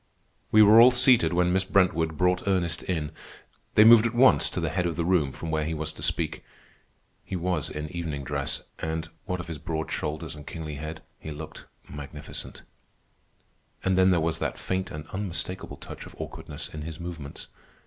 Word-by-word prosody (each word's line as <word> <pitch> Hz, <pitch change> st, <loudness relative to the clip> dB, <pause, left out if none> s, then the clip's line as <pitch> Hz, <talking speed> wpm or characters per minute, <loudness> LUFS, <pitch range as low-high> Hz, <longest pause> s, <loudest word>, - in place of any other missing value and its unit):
We 110 Hz, 0 st, +8 dB
were 110 Hz, +2 st, +8 dB
all 120 Hz, -, +9 dB
seated 125 Hz, -8 st, +5 dB
when 90 Hz, 0 st, +2 dB
Miss 95 Hz, 0 st, +2 dB
Brentwood 85 Hz, -5 st, +2 dB
brought 90 Hz, +1 st, +1 dB
Ernest 85 Hz, -5 st, +1 dB
in. 80 Hz, -5 st, -2 dB, 0.6 s
They 105 Hz, -, +8 dB
moved 115 Hz, 0 st, +8 dB
at 120 Hz, -, -5 dB
once 130 Hz, +2 st, +5 dB
to -, -, -4 dB
the -, -, -1 dB
head 90 Hz, -2 st, 0 dB
of 85 Hz, -, -3 dB
the 85 Hz, -, -1 dB
room, 85 Hz, -6 st, +2 dB
from 80 Hz, +4 st, -6 dB
where 80 Hz, 0 st, 0 dB
he 80 Hz, +1 st, -2 dB
was 80 Hz, 0 st, -4 dB
to -, -, -11 dB
speak. -, -, -1 dB, 0.8 s
He -, -, -5 dB
was 90 Hz, -4 st, -1 dB
in 75 Hz, 0 st, -5 dB
evening 80 Hz, -5 st, -4 dB
dress, 70 Hz, 0 st, -3 dB, 0.2 s
and, 80 Hz, 0 st, -3 dB, 0.2 s
what 90 Hz, 0 st, -2 dB
of 90 Hz, -, -5 dB
his 80 Hz, -3 st, -6 dB
broad 80 Hz, +1 st, -4 dB
shoulders 75 Hz, +2 st, -3 dB
and 75 Hz, -1 st, -11 dB
kingly 75 Hz, -3 st, -6 dB
head, 80 Hz, +2 st, -7 dB, 0.2 s
he -, -, -8 dB
looked 75 Hz, +1 st, -8 dB, 0.2 s
magnificent. 75 Hz, +1 st, -7 dB, 1.2 s
And 95 Hz, 0 st, +2 dB
then 95 Hz, 0 st, +5 dB
there 90 Hz, -2 st, +4 dB
was 80 Hz, 0 st, -1 dB
that -, -, -2 dB
faint 95 Hz, 0 st, -2 dB
and 75 Hz, 0 st, -7 dB
unmistakable 95 Hz, -2 st, -4 dB
touch -, -, -9 dB
of -, -, -14 dB
awkwardness 75 Hz, +1 st, -6 dB
in 75 Hz, -, -7 dB
his 80 Hz, +2 st, -7 dB
movements. 85 Hz, -5 st, -7 dB
80 Hz, 190 wpm, -27 LUFS, 75-95 Hz, 1.2 s, all